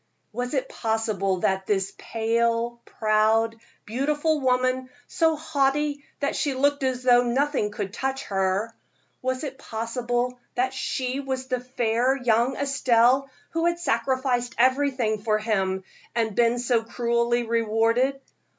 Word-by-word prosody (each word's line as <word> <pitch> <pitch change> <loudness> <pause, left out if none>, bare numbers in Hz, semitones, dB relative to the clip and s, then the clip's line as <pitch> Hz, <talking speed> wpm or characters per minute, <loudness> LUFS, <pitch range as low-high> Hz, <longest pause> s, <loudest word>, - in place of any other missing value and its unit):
was 245 +4 -3
it 265 - 0
possible 215 -5 -1
that 190 0 0
this 195 -1 0
pale, 230 +1 0
proud, 220 +1 +2 0.3
beautiful 295 +7 0
woman, 255 0 +1 0.2
so 325 -1 +2
haughty 290 -1 0 0.2
that 280 - 0
she 280 -3 0
looked 285 +2 +2
as 260 -1 -1
though 245 -1 +6
nothing 255 -1 0
could 205 -1 -5
touch 270 +3 -2
her 195 +3 -1 0.5
was 260 +2 -2
it 270 -2 -6
possible 240 +2 -2 0.2
that 255 +2 0
she 260 0 -2
was 260 -1 -4
the 255 -1 0
fair 245 0 +1
young 245 +1 +2
Estelle 270 -1 +3 0.2
who 330 +1 +1
had 345 0 +1
sacrificed 250 -4 0
everything 255 -4 +2
for 215 0 +1
him, 190 -3 -1 0.3
and 225 -2 0
been 240 0 +3
so 240 -1 +1
cruelly 235 +1 0
rewarded? 230 +3 +1
245 Hz, 130 wpm, -25 LUFS, 225-265 Hz, 0.5 s, though